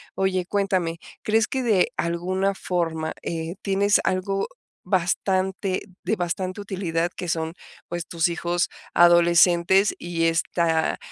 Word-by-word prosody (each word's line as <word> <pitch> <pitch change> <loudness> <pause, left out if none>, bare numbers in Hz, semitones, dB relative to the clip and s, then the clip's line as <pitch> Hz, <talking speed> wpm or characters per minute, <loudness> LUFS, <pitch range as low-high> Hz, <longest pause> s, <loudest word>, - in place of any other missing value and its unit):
Oye, 185 -2 0
cuéntame, 190 -5 0 0.2
¿crees 220 0 +2
que 265 - -2
de 215 -7 +2
alguna 185 +4 -1
forma, 165 -4 -2
eh, 165 0 -4
tienes 200 +1 +2
algo 190 +1 -1 0.4
bastante 190 +1 0 0.2
de 220 - 0
bastante 185 +2 -3
utilidad 175 -4 -2
que 180 - -5
son, 160 0 -1 0.4
pues, 175 -1 -4
tus 170 0 +1
hijos 175 +1 -1 0.3
adolescentes, 175 +2 +5
y 170 -1 -2
esta 165 -1 +1
175 Hz, 120 wpm, -24 LUFS, 170-190 Hz, 0.4 s, adolescentes